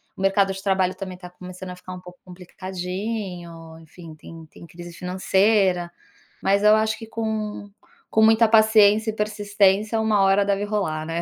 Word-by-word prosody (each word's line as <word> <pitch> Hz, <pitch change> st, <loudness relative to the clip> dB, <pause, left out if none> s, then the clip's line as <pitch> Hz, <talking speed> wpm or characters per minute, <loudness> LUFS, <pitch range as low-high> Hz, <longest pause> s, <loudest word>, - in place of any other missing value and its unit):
o -, -, -9 dB
mercado 195 Hz, 0 st, +2 dB
de 190 Hz, -, -8 dB
trabalho 190 Hz, -2 st, 0 dB
também 185 Hz, -1 st, -8 dB
tá 180 Hz, -1 st, -11 dB
começando 185 Hz, 0 st, -10 dB
a -, -, -8 dB
ficar 180 Hz, 0 st, -10 dB
um 180 Hz, -, -8 dB
pouco 180 Hz, 0 st, -14 dB
complicadinho, 180 Hz, -2 st, -7 dB
enfim, 165 Hz, 0 st, -13 dB
tem 165 Hz, +1 st, -13 dB
tem 170 Hz, -, -15 dB
crise 175 Hz, +2 st, -11 dB
financeira. 185 Hz, 0 st, +1 dB, 0.5 s
Mas 200 Hz, +1 st, +2 dB
eu 210 Hz, 0 st, +6 dB
acho 220 Hz, 0 st, 0 dB
que 225 Hz, -, -10 dB
com 215 Hz, -2 st, -4 dB, 0.4 s
com 220 Hz, -, +2 dB
muita 225 Hz, +1 st, +5 dB
paciência 220 Hz, -1 st, +4 dB
e -, -, -12 dB
persistência 210 Hz, 0 st, +1 dB
uma 215 Hz, -2 st, +2 dB
hora 195 Hz, +1 st, +3 dB
deve 200 Hz, 0 st, 0 dB
rolar, 190 Hz, -7 st, -2 dB
né. 165 Hz, +1 st, -3 dB
195 Hz, 170 wpm, -22 LUFS, 180-210 Hz, 0.5 s, eu